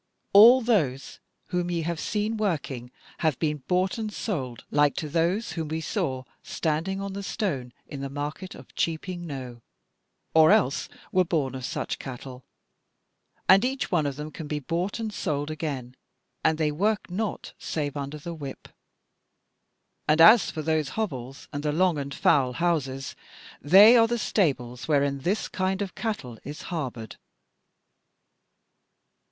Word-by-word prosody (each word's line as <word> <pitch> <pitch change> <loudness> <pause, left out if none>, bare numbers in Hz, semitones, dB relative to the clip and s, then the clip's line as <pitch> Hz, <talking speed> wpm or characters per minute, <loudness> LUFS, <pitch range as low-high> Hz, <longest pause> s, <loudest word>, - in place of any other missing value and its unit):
All 235 +6 +9
those 150 - 0 0.3
whom 180 -1 -1
ye 170 -1 -1
have 170 0 -2
seen 210 +4 -1
working 145 - -2 0.3
have 155 -5 +1
been 150 -2 0
bought 185 +4 +1
and 215 -1 -3
sold 135 - -4
like 145 -1 +3
to 155 - -3
those 170 +8 0
whom 160 -3 -3
we 160 +1 -2
saw 130 -4 -2 0.2
standing 165 +5 -2
on 195 0 -4
the 200 - -4
Stone 145 - -3
in 140 - -7
the 135 - -4
market 150 +6 -5
of - - -14
Cheaping 175 +2 -2
Knowe, 130 -5 -7 0.7
or 160 -1 +7
else 130 +3 +2 0.2
were 185 - +4
born 155 -7 -1
of 130 -1 -6
such - - -3
cattle, 130 -1 -8 1.0
and 190 +2 +7
each 265 +2 -1
one 160 -5 +2
of 140 - -3
them 150 +2 -6
can 155 0 -7
be 150 - -2
bought 170 +7 -2
and 220 -2 -3
sold 150 -5 -2
again, 140 -5 -4 0.5
and 160 - +3
they 155 -2 +1
work 205 +5 0
not 210 +3 -3
save 145 -3 -3
under 140 +1 -4
the 170 +3 -7
whip. 140 -5 -8 1.4
And 155 +1 +3
as 215 +7 +8
for 155 - -5
those 155 -2 0
hovels 135 - -4
and 145 - -3
the 150 0 0
long 170 0 +2
and 140 0 -5
foul 135 -4 +3
houses, 140 -5 -1 0.5
they 200 +10 +8
are 230 -1 +6
the 240 +1 -1
stables 130 - -1
wherein 140 -2 +2
this 185 +10 -1
kind 190 0 -1
of 200 -2 -3
cattle 130 - -4
is 145 +2 -7
harboured." 125 -8 -5
155 Hz, 155 wpm, -26 LUFS, 140-190 Hz, 1.4 s, All